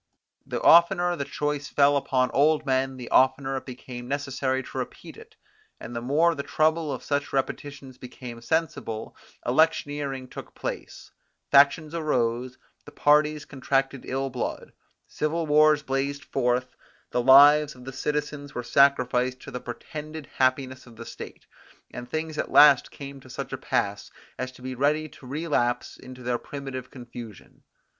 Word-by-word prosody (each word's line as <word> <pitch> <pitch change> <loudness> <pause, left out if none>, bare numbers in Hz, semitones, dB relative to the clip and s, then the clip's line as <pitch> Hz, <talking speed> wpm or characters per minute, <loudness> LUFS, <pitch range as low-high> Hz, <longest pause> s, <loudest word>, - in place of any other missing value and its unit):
The - - -3
oftener 175 +1 +5
the 140 -4 -4
choice 145 0 -3
fell 145 0 +3
upon 130 -2 +1
old 150 +2 +3
men, 130 -1 0
the 125 -2 -9
oftener 135 +1 +3
it 130 - -8
became 125 -1 -8
necessary 135 -1 -2
to - - -9
repeat - - -7
it, - - -15 0.4
and 120 - -8
the 115 - -3
more 155 +7 +3
the 140 - -4
trouble 155 +1 +1
of - - -5
such 145 0 -2
repetitions 135 -1 -4
became 125 -2 -9
sensible; 120 -6 -2 0.3
electioneering 145 -1 0
took - - -10
place; - - -7 0.4
factions 145 +3 +5
arose; 125 -6 -1 0.3
the - - -13
parties 150 0 +2
contracted 135 0 -1
ill 135 +1 -2
blood; 125 - -5 0.3
civil 160 +2 -2
wars 150 0 +4
blazed 140 +1 -2
forth; 125 -1 -1 0.4
the 125 - +1
lives 145 +3 +7
of 125 0 -14
the 135 - -7
citizens 150 +1 -3
were 120 - -3
sacrificed 130 -1 +2
to - - -10
the 125 - -5
pretended 155 +5 -7
happiness 130 0 0
of 120 - -14
the 115 +1 -9
state; - - -10 0.5
and 125 0 -8
things 155 +1 -3
at - - -2
last 145 -3 +7
came 140 -1 -9
to 130 - -16
such 125 - -6
a - - 0
pass, - - -2 0.3
as 130 0 -3
to 125 - -16
be 130 0 -4
ready 150 +4 +1
to 135 - -15
relapse 140 -4 -1
into 125 0 -12
their 120 0 -1
primitive 135 -3 -7
confusion. 120 -5 -11
135 Hz, 155 wpm, -26 LUFS, 125-150 Hz, 0.5 s, lives